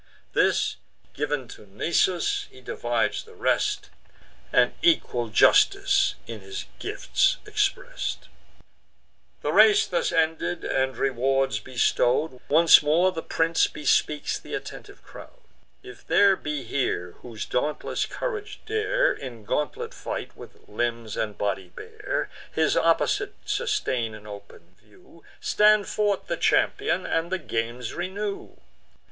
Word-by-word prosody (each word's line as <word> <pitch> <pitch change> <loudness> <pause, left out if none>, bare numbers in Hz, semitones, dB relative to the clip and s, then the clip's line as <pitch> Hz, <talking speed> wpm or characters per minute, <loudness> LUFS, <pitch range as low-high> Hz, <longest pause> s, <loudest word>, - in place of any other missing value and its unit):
This - - +2 0.4
giv'n 145 -3 -2
to 105 - -12
Nisus, 180 - 0
he - - -16
divides 475 - -1
the 455 0 -17
rest, 415 -1 0 0.6
And - - +4
equal 315 - +2
justice 105 - +4
in 115 -2 -7
his 95 0 -7
gifts - - +1
express'd. - - -2 1.2
The 150 - -1
race 215 +1 +6
thus 175 - -1
ended, 160 +1 0
and 130 0 -1
rewards 135 -3 +1
bestow'd, 125 +3 +1
Once 165 +3 +7
more 165 +5 +3
the 165 - -5
prince 165 0 +1
bespeaks 150 0 0
th' - - -17
attentive - - -8
crowd: - - -13 0.4
"If 125 -1 -13
there 195 +4 +5
be 150 -5 -4
here, 115 -8 -2
whose 115 -3 -7
dauntless 150 +4 -2
courage 425 -3 -5
dare 470 +4 +1
In 115 -4 -9
gauntlet 150 +6 -2
fight, - - -6
with - - -14
limbs 115 0 -3
and 105 -2 -3
body 100 -2 -2
bare, - - -4 0.2
His 160 -1 +1
opposite 405 - +1
sustain 130 - -1
in 105 -1 -13
open 100 -4 -12
view, 165 - -21 0.2
Stand 210 -1 +4
forth 205 -2 0
the - - -3
champion, 410 - +1
and 165 +2 -1
the 190 - +1
games 120 -6 -4
renew. 195 +3 -5
150 Hz, 125 wpm, -25 LUFS, -, 1.2 s, Once